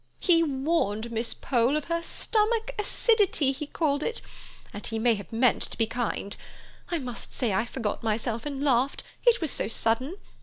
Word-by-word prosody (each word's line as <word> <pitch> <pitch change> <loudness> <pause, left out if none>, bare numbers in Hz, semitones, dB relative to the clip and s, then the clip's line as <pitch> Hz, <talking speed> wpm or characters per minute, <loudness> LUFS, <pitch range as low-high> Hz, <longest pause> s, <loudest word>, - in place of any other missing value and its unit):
He 335 -3 +4
warned 265 -7 0
Miss 230 +1 0
Pole 250 +3 +1
of 305 - -3
her 335 0 -1
stomach 450 +6 +1
acidity, 410 - +3
he 285 +2 -5
called 290 -2 0
it—and 305 - -7
he 225 - -3
may 235 +1 +3
have 200 -2 -7
meant 235 +2 +3
to - - -5
be 225 - +3
kind. 225 -3 -3 0.5
I 345 - 0
must 250 -5 -5
say 230 -5 0
I 190 +5 +1
forgot 230 -3 -3
myself 225 +3 -1
and 280 -1 -4
laughed; 265 -1 +2 0.2
it 480 -3 +5
was 315 -5 +1
so - - 0
sudden. 230 - 0
265 Hz, 175 wpm, -27 LUFS, 230-330 Hz, 0.5 s, it